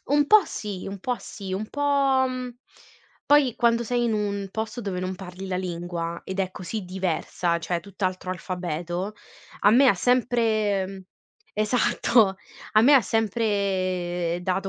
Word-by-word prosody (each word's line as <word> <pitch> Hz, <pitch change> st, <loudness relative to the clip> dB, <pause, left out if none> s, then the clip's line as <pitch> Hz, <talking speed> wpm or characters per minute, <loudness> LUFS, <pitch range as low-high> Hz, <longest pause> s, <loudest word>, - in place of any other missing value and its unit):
Un 290 Hz, 0 st, +3 dB
po' 430 Hz, +2 st, +7 dB
sì, 205 Hz, -3 st, -6 dB
un 195 Hz, 0 st, -6 dB
po' 245 Hz, +5 st, -2 dB
sì, 195 Hz, -3 st, -8 dB
un 210 Hz, +3 st, -3 dB
po' 275 Hz, -2 st, +2 dB
mhmm, 255 Hz, -1 st, -4 dB, 0.8 s
poi 285 Hz, -5 st, +4 dB
quando 235 Hz, -1 st, +2 dB
sei 240 Hz, +1 st, 0 dB
in 230 Hz, -, +1 dB
un 200 Hz, -2 st, -2 dB
posto 220 Hz, +3 st, -4 dB
dove 195 Hz, -4 st, -3 dB
non 185 Hz, +1 st, -3 dB
parli 190 Hz, 0 st, -8 dB
la 185 Hz, -1 st, -2 dB
lingua 170 Hz, -2 st, -4 dB
ed 190 Hz, +1 st, -3 dB
è 185 Hz, -1 st, -1 dB
così 185 Hz, +3 st, -5 dB
diversa, 180 Hz, -1 st, -1 dB
cioè 170 Hz, 0 st, -2 dB
tutt'altro 185 Hz, -1 st, -3 dB
alfabeto, 180 Hz, +1 st, -4 dB, 0.5 s
a 205 Hz, -, +6 dB
me 265 Hz, +5 st, +6 dB
ha 200 Hz, -, +5 dB
sempre 215 Hz, -4 st, +1 dB, 0.5 s
esatto, 220 Hz, -2 st, +2 dB, 0.4 s
a 215 Hz, -, +6 dB
me 280 Hz, +5 st, +7 dB
ha 265 Hz, -, +8 dB
sempre 185 Hz, -6 st, 0 dB
dato 190 Hz, +2 st, -1 dB
200 Hz, 150 wpm, -25 LUFS, 185-235 Hz, 0.8 s, ha